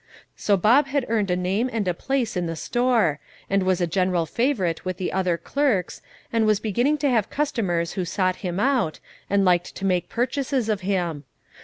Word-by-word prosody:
So 200 -1 +2
Bob 245 +10 +4
had 275 -1 0
earned 215 -4 +1
a 180 - +2
name 190 +7 0
and 220 -4 -2
a 180 - +2
place 255 +4 -2
in 175 -1 -1
the 165 - -3
store, 230 - +1 0.3
and 195 0 +3
was 185 -1 +1
a 175 - +2
general 180 0 +1
favourite 195 - 0
with 185 -1 -3
the 185 - -3
other 185 -3 +1
clerks, 215 - -1 0.3
and 225 -1 +2
was 210 -2 +3
beginning 240 +8 +1
to - - +4
have 220 -5 +1
customers 205 - -1
who 185 - -2
sought 185 +1 0
him 180 -1 -3
out, 250 - +1 0.3
and 200 0 +3
liked 175 -1 +2
to 195 - -4
make 180 -2 0
purchases 255 0 -1
of 210 -2 0
him. 175 -6 -2
195 Hz, 195 wpm, -24 LUFS, 180-240 Hz, 0.3 s, Bob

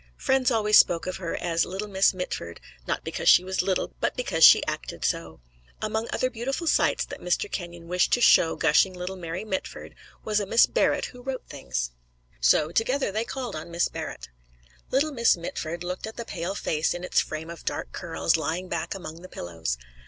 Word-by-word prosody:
Friends 265 -1 +2
always 215 -3 +5
spoke 170 -2 +3
of 185 - -3
her 175 -3 -4
as 170 -1 0
"Little 195 +3 -4
Miss 195 -1 +3
Mitford," 135 - -5 0.3
not - - -2
because - - 0
she 180 - +7
was 190 0 -1
little, 185 0 -1
but - - 0
because 165 -10 0
she - - +9
acted - - -4
so. 80 -5 -2 0.4
Among 220 +1 -2
other 255 - 0
beautiful 260 +8 -3
sights - - +2
that - - -9
Mr. 420 - -1
Kenyon 170 -2 -6
wished 180 +1 +1
to - - +4
show 170 -8 +5
gushing 165 +4 +3
little 180 +1 -5
Mary 175 +2 -5
Mitford 190 -3 -5 0.3
was 215 -1 +1
a 200 - -3
Miss 230 - +6
Barrett - - +1
who 250 - -12
wrote 260 0 -5
things. - - -4 0.5
So 110 - +3
together 255 +5 +1
they 220 +3 -1
called 255 -5 -5
on 155 +2 -7
Miss 170 +1 0
Barrett. 60 0 -7 0.6
Little 290 +3 +1
Miss 235 -8 +3
Mitford 170 0 -5
looked 180 +4 -4
at 220 - -9
the 235 - -5
pale 180 +1 -4
face 155 -4 0
in 175 - -6
its 180 - +2
frame 160 +2 -6
of 170 - -10
dark - - -3
curls, - - 0
lying 160 +4 -3
back 170 0 -3
among 170 -3 -8
the 185 - -11
pillows. 80 -8 -4
180 Hz, 195 wpm, -26 LUFS, 165-220 Hz, 0.6 s, she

